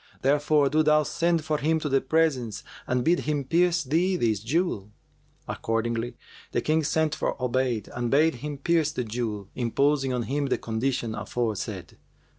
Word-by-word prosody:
Therefore 145 +1 +3
do 155 +3 +3
thou 155 0 +4
send 170 0 0
for 155 -1 0
him 160 +2 +1
to 155 - -3
the 135 -1 +2
presence 135 -7 0 0.2
and 125 -1 +1
bid 175 +2 +4
him 150 -2 -1
pierce 170 +3 +2
thee 170 +7 +1
this 110 - +1
jewel.' 115 - -1 0.6
Accordingly 115 +1 -2 0.4
the 120 - +1
King 155 +4 +2
sent 155 +1 +1
for - - -2
Obayd 125 -4 0
and 120 -1 -1
bade 155 +5 +4
him 145 0 -4
pierce 160 +1 +1
the 125 - -2
jewel, 110 -3 -4
imposing 135 +3 +1
on 125 -1 -1
him 140 +3 -1
the - - +1
condition 120 0 -2
aforesaid. 110 0 -4
140 Hz, 165 wpm, -26 LUFS, 120-155 Hz, 0.6 s, thou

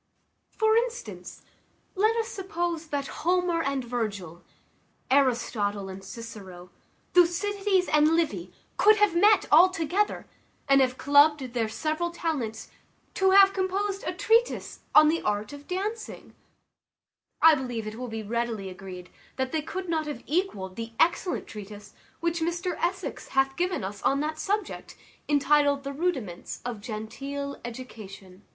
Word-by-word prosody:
For 440 0 +3
instance, 480 0 -4 0.5
let 430 +4 +2
us 455 -1 -1
suppose 345 -6 -3
that 285 -2 -2 0.2
Homer 355 -1 +1
and 275 -3 -1
Virgil, 205 -8 -4 0.7
Aristotle 225 -7 +1
and 190 0 -8
Cicero, 195 -4 -10 0.4
Thucydides 380 +2 +2
and 305 +1 +4
Livy, 200 - -1 0.3
could 430 +1 +6
have 415 -4 +3
met 410 +3 +5
all 340 +5 +8
together, 370 +3 -1 0.4
and 275 -1 +5
have 255 -1 +1
clubbed 285 -3 +4
their 230 -3 0
several 310 +8 -2
talents 280 -11 -3 0.4
to 380 0 +3
have 390 0 +7
composed 390 +1 -1
a - - -2
treatise 450 +6 +1 0.2
on 305 0 +9
the 325 +2 +1
art 210 +4 -2
of 285 0 -11
dancing: 415 +5 -5 1.1
I 325 0 +8
believe 245 -6 -3
it 215 - -5
will 250 +3 -6
be 225 -1 -5
readily 225 -2 -2
agreed 180 -1 -10 0.3
they 260 +4 -1
could 370 +4 -5
not 320 -2 -1
have 285 -5 -6
equalled 280 - -2
the 230 0 -6
excellent 350 +2 +1
treatise 210 -1 -10 0.3
which 340 0 -1
Mr 345 +2 -1
Essex 365 +2 -3
hath 270 0 +1
given 360 - -1
us 195 +1 -6
on 275 - +2
that 310 +1 -3
subject, 415 +1 -3 0.3
entitled, 285 -1 +3
The 275 0 -5
Rudiments 270 - -3
of 235 -4 -4
Genteel 275 +6 -6
Education. 210 -6 -10
290 Hz, 140 wpm, -27 LUFS, 225-360 Hz, 1.1 s, on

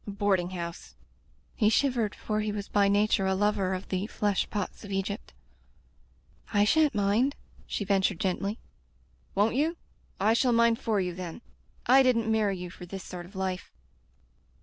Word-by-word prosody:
"A - - -4
boarding 200 -3 +1
house" 170 - -7 0.3
— - - -36
he 210 - +3
shivered, 235 -3 +1
for 215 -1 -2
he 215 0 -1
was 205 -1 -4
by 200 -1 +3
nature 200 -1 +2
a 190 - +2
lover 200 -2 +1
of 185 - -7
the 190 +2 -1
flesh 205 -3 0
pots 205 0 -4
of 205 - -8
Egypt. 195 +2 -3 1.2
I 205 -2 +4
shan't 305 +1 +3
mind," 210 +7 +2 0.3
she 205 - -3
ventured 195 -2 +1
gently. 200 +2 -1 0.4
*' - - -35
Won't 205 +3 +3
you? 315 +6 +1 0.4
I 215 +3 +4
shall 245 +1 +3
mind 235 0 +4
for 215 -3 0
you, 180 -2 -1
then. 180 +5 -7 0.4
I 265 +3 +7
didn't 230 -4 +2
marry 210 -3 +1
you 180 -1 -7
for 180 0 -10
this 190 +1 -7
sort 175 -1 -8
of 195 - -18
life." 190 -1 -3
205 Hz, 175 wpm, -28 LUFS, 190-220 Hz, 1.2 s, I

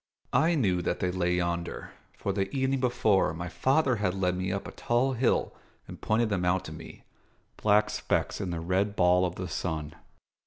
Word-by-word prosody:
I 160 +7 +3
knew 95 - +1
that - - -2
they 90 - 0
lay 90 -1 0
yonder; 85 -1 -3 0.3
for, 100 - -2
the 95 -1 -1
evening 135 0 0
before, 110 - +2
my 85 +2 -5
father 130 - +2
had 95 -3 0
led 90 -2 0
me 95 +1 -2
up 100 +1 -3
a - - -7
tall 125 +3 0
hill 125 0 +1 0.3
and - - -10
pointed 110 +1 +1
them 95 -4 -1
out 90 +1 +1
to - - -7
me 80 +1 -11 0.6
black 105 0 +3
specks - - -1
in 95 - -3
the 85 -1 -3
red 95 +4 0
ball 90 0 +4
of 90 - -7
the 90 - -5
sun. 80 -3 -3
95 Hz, 195 wpm, -28 LUFS, 90-115 Hz, 0.6 s, ball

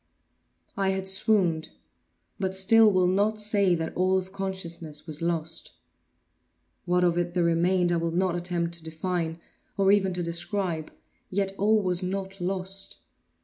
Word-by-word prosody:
I 195 -1 +1
had 190 0 -2
swooned; 190 -4 +1 0.7
but 190 -1 -1
still 215 +3 +6
will 185 -1 +3
not 205 +4 +2
say 205 -3 +3
that 160 -1 -4
all 185 +1 +2
of 190 0 -4
consciousness 170 -6 -5
was 155 -2 -7
lost. 165 -1 -3 1.1
What 180 0 +2
of 175 -1 +2
it 175 0 -2
there 175 - +2
remained 175 +2 +2
I 170 - +2
will 165 0 -1
not 175 +1 0
attempt 175 -1 -1
to 170 -1 -9
define, 165 0 -3 0.4
or 195 0 +4
even 195 -2 +3
to 180 - -1
describe; 170 -1 -2 0.4
yet 195 0 0
all 210 +1 +3
was 180 -1 0
not 195 +1 -4
lost. 190 +1 -4
185 Hz, 150 wpm, -27 LUFS, 170-195 Hz, 1.1 s, still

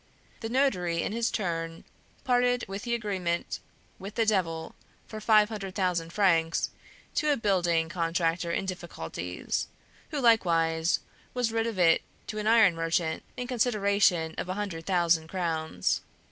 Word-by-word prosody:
The 225 - -4
notary 180 -11 +1
in - - -2
his 230 +2 0
turn 165 -4 -3 0.4
parted 245 -1 +2
with 195 +1 -5
the 235 0 -1
agreement 190 -6 -2 0.4
with 200 +2 -8
the 225 - +2
Devil 170 -6 0 0.3
for 215 -1 -8
five 215 -1 +5
hundred 195 -4 -6
thousand 180 -4 0
francs 165 -4 +2 0.4
to 300 -1 +2
a 285 - +2
building 175 -6 +2
contractor 170 0 0
in 195 - -1
difficulties, 90 - -4 0.4
who 300 - -2
likewise 165 -9 +3 0.3
was 245 -2 +1
rid 225 0 0
of 225 -4 -4
it 170 -2 +5 0.2
to 215 - -5
an 210 - -2
iron 220 -5 +6
merchant 165 -1 -1 0.2
in 250 - -3
consideration 200 -8 +2
of - - -4
a 185 - -1
hundred 190 -6 -4
thousand 170 -3 +2
crowns. 160 - -1
185 Hz, 145 wpm, -28 LUFS, 165-220 Hz, 0.4 s, iron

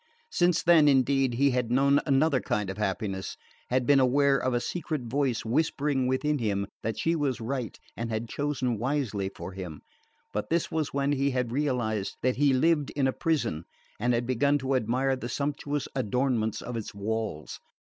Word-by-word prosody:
Since 175 -1 +2
then, 165 -3 +6
indeed, 135 -2 +3
he 140 +3 +3
had 125 -2 0
known 140 +3 +4
another 140 0 +3
kind 105 -3 -1
of 95 - -8
happiness, 95 -1 -2 0.3
had 125 0 +1
been 140 +1 +5
aware 135 +2 +4
of 130 -1 0
a 120 - +1
secret 155 0 -3
voice 125 -1 -1
whispering 140 +1 +1
within 145 +3 0
him 100 -3 0 0.2
that 110 -1 -3
she 165 +1 +1
was 145 -5 -1
right 120 0 -4 0.2
and 115 0 -4
had 110 +1 -2
chosen 130 -5 -2
wisely 120 -7 -1
for - - -7
him; 90 -5 -7 0.5
but 105 - -3
this 170 0 0
was 155 -3 -1
when 140 0 0
he 140 0 +1
had 125 -3 -1
realised 120 -7 -1
that 130 0 +1
he 145 0 +4
lived 150 +2 +2
in 140 -2 +1
a 130 - +1
prison, 125 - -1 0.4
and 120 +2 +2
had 120 +1 -1
begun 135 +4 +2
to 135 -1 -2
admire 130 +2 +1
the 120 -2 -6
sumptuous 145 +1 -2
adornment 125 -2 0
of 125 - -5
its 110 -3 -5
walls. 105 -6 -3
130 Hz, 180 wpm, -28 LUFS, 115-140 Hz, 0.5 s, then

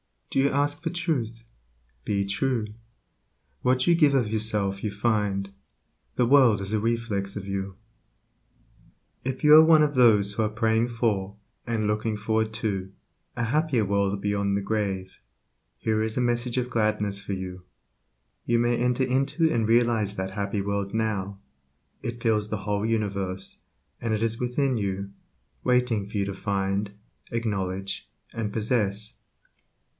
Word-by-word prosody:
Do - - +1
you 140 +1 +4
ask 145 +2 0
for 165 - -2
truth? 135 -11 -2 0.6
Be 100 -1 0
true. 110 +3 -1 1.0
What 130 0 +2
you 175 - +5
give 150 -4 +4
of 120 -6 +2
yourself 105 -3 0
you 105 - -1
find; 100 -2 0 0.7
Your 125 - +4
world 125 -5 +5
is 100 +1 -3
a 110 - +2
reflex 110 -3 -1
of 100 -2 -5
you. 95 -1 -4 1.5
If 130 0 -3
you 150 0 +7
are 155 - +10
one 160 -1 +6
of 145 -1 +1
those 105 -6 +5
who 110 - 0
are 105 - +1
praying 115 +1 +1
for, 105 -5 -1 0.3
and 115 -2 0
looking 105 +1 0
forward 110 +1 0
to, 100 -4 -2 0.4
a 120 - -1
happier 135 -1 +1
world 100 0 0
beyond 100 -1 0
the 100 - 0
grave, 95 -3 -2 0.6
here 110 -1 0
is 110 +1 -1
a - - +2
message 120 0 0
of 125 -1 0
gladness 105 -3 +1
for 100 0 -4
you, 90 -1 -6 0.8
you 120 - +2
may 120 0 +2
enter 125 +1 +1
into 135 +6 +1
and 115 -2 +1
realize 115 -3 +2
that 95 0 -3
happy 100 0 -2
world 100 0 -2
now; 100 -3 -2 0.6
it 120 0 -5
fills 105 -2 +1
the 110 - -2
whole 105 0 0
universe, 100 -4 -2 0.4
and 115 -2 -1
it 110 - -2
is 115 0 0
within 125 +1 0
you, 100 -1 -3 0.5
waiting 125 -5 +1
for 105 - -4
you 100 - +1
to 100 - -4
find, 100 +1 -1 0.4
acknowledge, 95 -4 -3 0.2
and 105 -3 -3
possess. 105 -2 -1
110 Hz, 155 wpm, -26 LUFS, 100-120 Hz, 1.5 s, are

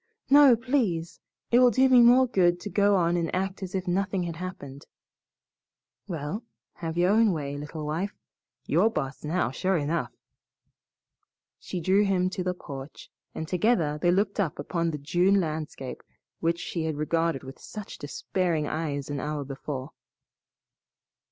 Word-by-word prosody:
"No, 280 -3 +8
please! 225 - -1 0.3
It 240 - +6
will 250 -1 +7
do 260 +4 +4
me 255 -2 +7
more 245 +2 +7
good 175 -7 +2
to 205 - -6
go 205 0 +3
on 175 -2 +2
and 170 -2 0
act 190 +1 -2
as 190 -1 -5
if 185 0 -2
nothing 190 +1 0
had 170 -2 -5
happened." 145 -6 -8 1.2
"Well, 170 +4 -4 0.3
have 165 -1 -4
your 180 +2 +3
own 220 -2 +4
way, 145 -3 -4
little 150 +1 -6
wife. 170 +7 -2 0.5
You're 225 - +3
boss 135 -11 -4
now, 155 -3 0
sure 185 +7 0
enough." 155 +2 -1 1.5
She 185 - -5
drew 190 +4 +3
him 185 -2 +1
to 185 -1 -3
the 180 0 -1
porch, 140 -4 -9 0.2
and 160 - -4
together 175 -5 +1
they 175 - +3
looked 200 +3 +1
upon 170 -1 -1
the 155 - -3
June 175 +7 +2
landscape 155 -5 -4 0.4
which 165 +1 +1
she 165 -1 -3
had 155 -2 -2
regarded 165 -1 0
with 135 0 -10
such 210 -2 -9
despairing 165 +2 -1
eyes 145 -3 -3
an 145 -1 -3
hour 150 0 -3
before. 135 -1 -6
175 Hz, 155 wpm, -27 LUFS, 150-195 Hz, 1.5 s, No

